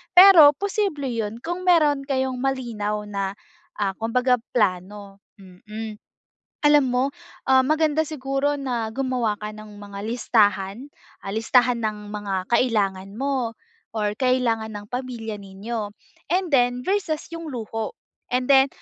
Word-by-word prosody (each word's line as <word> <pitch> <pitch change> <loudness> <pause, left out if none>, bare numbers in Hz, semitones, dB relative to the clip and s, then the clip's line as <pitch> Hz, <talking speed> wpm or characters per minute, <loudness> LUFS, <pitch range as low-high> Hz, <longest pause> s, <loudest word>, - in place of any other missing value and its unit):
pero 355 -6 +9
posible 380 - -1
yun 225 -2 -3
kung 350 +2 -4
meron 305 -5 +4
kayong 260 -2 -1
malinaw 230 -6 -2
na 200 -1 -3 0.4
ah, 200 -2 0
kumbaga 250 +2 +2 0.2
plano, 200 -1 -1 0.2
mm. 210 +3 -9 0.7
Alam 295 -1 +6
mo 250 +1 +2 0.4
ah, 260 0 +5
maganda 310 +2 +2
siguro 285 -1 -1
na 240 -5 -2
gumawa 245 -4 -1
ka 210 0 -6
ng 215 -1 -11
mga 200 -1 -9
listahan, 210 +1 +1 0.3
ah, 195 - -5
listahan 245 +3 +3
ng 210 -2 -4
mga 200 -3 -4
kailangan 200 -5 +1
mo 260 -2 -1 0.4
or 210 -2 0
kailangan 235 -4 +1
ng 205 0 -7
pamilya 240 -4 -5
ninyo, 205 +3 -5 0.5
and 370 -2 0
then 245 -2 +2
versus 360 -3 -1
yung 330 0 -7
luho. 225 - -4 0.3
And 250 0 0
then 270 +1 +5
240 Hz, 130 wpm, -23 LUFS, 210-275 Hz, 0.7 s, pero